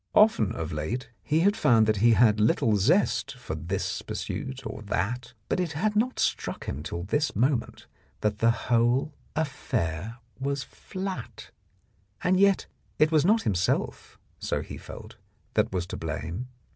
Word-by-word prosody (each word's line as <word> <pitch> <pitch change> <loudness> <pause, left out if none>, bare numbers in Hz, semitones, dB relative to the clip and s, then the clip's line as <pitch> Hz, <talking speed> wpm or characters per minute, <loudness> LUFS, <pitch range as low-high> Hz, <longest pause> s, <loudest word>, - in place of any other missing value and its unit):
Often 165 - +5
of 80 -7 -4
late 90 - -3
he 155 +2 +1
had 200 +4 +4
found 110 - +4
he 115 +3 +5
had 110 -2 +5
little 110 0 +3
zest 135 - +2
for 120 -10 -6
this 85 +5 -2
pursuit 130 -1 -5
or 110 - -5
tfiat, 115 +5 -2
but - - 0
it 175 -3 -1
had 210 +8 0
not 245 +5 +1
struck - - -1
him 65 - -4
till 85 +2 -4
this 145 - 0
moment 125 +2 0 0.4
that 105 -1 0
the 115 - +4
whole 120 +5 +2 0.2
affair 115 - -2 0.2
was 140 0 -1
flat. 190 0 -7 0.7
And 185 +1 +3
yet 200 -1 +4 0.3
it 155 +1 +4
was 155 -2 +4
not 220 +4 +4
himself, 90 -3 -1 0.2
so - - -1
he - - -8
felt, - - -10 0.4
that - - +2
was 90 -2 -1
to - - -6
blame. 90 - -4
120 Hz, 155 wpm, -27 LUFS, 105-155 Hz, 0.7 s, Often